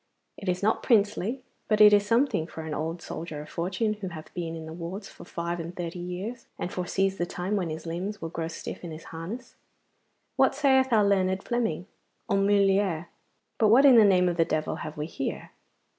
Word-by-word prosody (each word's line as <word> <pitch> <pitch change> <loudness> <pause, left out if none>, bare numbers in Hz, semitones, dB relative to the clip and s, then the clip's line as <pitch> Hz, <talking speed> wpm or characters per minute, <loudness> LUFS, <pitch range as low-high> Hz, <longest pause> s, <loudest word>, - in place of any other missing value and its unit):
It 195 - -5
is 180 +2 -1
not 215 - +2
princely, 220 +2 +1 0.2
but 215 -1 +2
it 210 -1 +9
is 205 0 +4
something 230 - +2
for 160 - -8
an 160 -1 -4
old 165 +3 -3
soldier 160 -2 -6
of 150 - -14
fortune 185 +6 -1
who 205 -2 -6
hath 155 -3 -10
been 165 -2 -4
in 160 -1 -7
the 160 - -8
wars 180 +4 -6
for - - -13
five 170 0 -3
and 170 +2 -6
thirty 175 0 -5
years, 180 +7 -5
and 175 - -4
foresees 195 +2 0
the 175 - 0
time 180 +4 -2
when 180 -5 -1
his 160 +2 -6
limbs 185 +5 -4
will 165 - -5
grow 160 0 -3
stiff 165 - -7
in 175 - -5
his 160 0 -8
harness. 170 +10 -7 0.8
What 265 0 +4
sayeth 265 -2 +3
our 215 -3 +5
learned 190 -1 +2
Fleming 225 -9 -1 0.4
"an 195 0 +2
mulier 195 -4 +2 0.2
" - - -48
but 220 - +5
what 245 +7 +6
in 265 -3 +8
the 225 - +8
name 185 -3 +5
of 175 -1 -1
the 165 - +5
devil 155 -1 -2
have 155 - -7
we 150 - -2
here? 145 -4 -5
185 Hz, 215 wpm, -27 LUFS, 165-210 Hz, 0.8 s, it